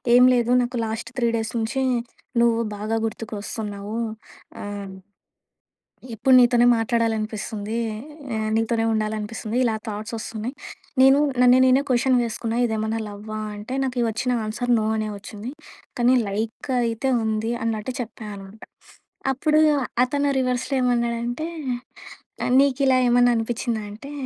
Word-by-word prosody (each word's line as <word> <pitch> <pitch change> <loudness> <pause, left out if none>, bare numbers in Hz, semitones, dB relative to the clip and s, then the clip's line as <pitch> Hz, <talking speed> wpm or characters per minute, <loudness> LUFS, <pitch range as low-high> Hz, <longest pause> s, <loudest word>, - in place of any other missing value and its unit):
"ఏం 250 - +8
లేదు 240 0 +2
నాకు 245 0 -3
లాస్ట్ 225 +1 -5
3 235 -1 +2
డేస్ 220 0 -3
నుంచి 250 +4 -1 0.6
నువ్వు 230 -1 +3 0.2
బాగా 215 +2 -1
గుర్తుకొస్తున్నావు." 210 -1 -5 0.7
ఆహ్ 200 -1 -6 1.2
"ఎప్పుడు 260 +4 +3
నీతోనే 240 -1 +5
మాట్లాడాలనిపిస్తుంది. 220 -2 -1 0.6
ఆహ్, 215 0 -1
నీతోనే 225 0 +1
ఉండాలనిపిస్తుంది. 215 +1 -2
ఇలా 230 -3 +1
థాట్స్ 215 +1 -5
వస్తున్నాయి. 225 +3 -5 0.5
నేను 270 +1 +7 0.2
నన్ను 250 0 +7
నేనే 260 +2 +5
క్వషన్ 255 +1 +3
వేసుకున్నా 230 0 -3
ఇదేమన్నా 220 0 -1
లవ్వా 210 +1 -7 0.2
అంటే 210 +5 -7
నాకు 250 -2 -1
వచ్చిన 240 +3 -1
ఆన్సర్ 240 +3 -2
నో 215 - -1
అనే 215 -1 -1
వచ్చింది. 210 +4 -8 0.5
కానీ 245 +1 +5
లైక్ 220 +6 -4 0.2
అయితే 230 +3 -1
ఉంది" 220 +1 -1
అన్నట్టు 225 +2 -2
చెప్పా 225 -1 -8
అనమాట. 195 +2 -12 0.7
అప్పుడు 305 +3 +2 0.4
అతను 285 +3 0
రివర్స్‌లో 255 +1 -1
ఏమన్నాడంటే, 240 +3 0 1.0
ఆహ్, - - 0
"నీకిలా 270 -1 +3
ఏమన్నా 245 0 +5
అనిపిచ్చిందా" 225 -1 -2
అంటే, 275 +8 -10
225 Hz, 125 wpm, -23 LUFS, 215-245 Hz, 1.2 s, ఏం